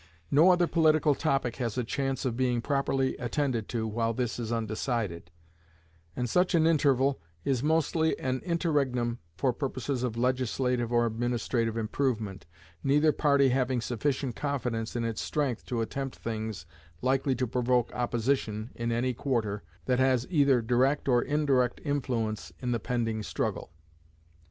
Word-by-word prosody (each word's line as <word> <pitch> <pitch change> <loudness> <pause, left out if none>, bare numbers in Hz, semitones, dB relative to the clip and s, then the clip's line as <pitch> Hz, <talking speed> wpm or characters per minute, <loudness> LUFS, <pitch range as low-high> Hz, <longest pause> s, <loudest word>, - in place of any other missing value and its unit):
No 160 +6 +6
other 180 -1 +5
political 155 -3 +3
topic 135 -5 0
has 120 -3 -2
a 125 - +1
chance 135 +3 -2
of 120 -3 0
being 125 -1 +1
properly 135 +1 0
attended 125 -2 -1
to 115 -2 -1
while 115 +1 -1
this 120 -1 -2
is 115 -1 -3
undecided; 110 -6 -2 0.9
and 125 - -1
such 180 - +2
an 160 -1 +4
interval 140 - +3 0.2
is 130 -3 +1
mostly 160 +1 +1
an 130 0 -1
interregnum 140 -9 0 0.2
for 130 +4 +1
purposes 130 -1 -3
of 120 -3 -2
legislative 125 -1 0
or 120 0 +3
administrative 115 0 -1
improvement, 110 - -2 0.4
neither 150 +3 +4
party 140 -3 +3
having 130 0 +1
sufficient 125 +1 -2
confidence 125 -6 -2
in 120 - -1
its 115 -1 -2
strength 140 -7 -2
to 120 -3 -1
attempt 135 +4 -4
things 110 -6 -5 0.4
likely 135 +1 +2
to 125 +1 0
provoke 125 0 +1
opposition 120 -2 -1
in 115 0 -2
any 125 +2 0
quarter 115 -6 -1 0.2
that 125 -1 +1
has 130 -2 +3
either 140 -7 +4
direct 130 +6 +2
or 120 -2 +4
indirect 140 -4 +1
influence 120 -7 -2
in 125 -1 -2
the 120 - 0
pending 115 -3 -1
struggle. 105 - -3
125 Hz, 145 wpm, -29 LUFS, 115-140 Hz, 0.9 s, No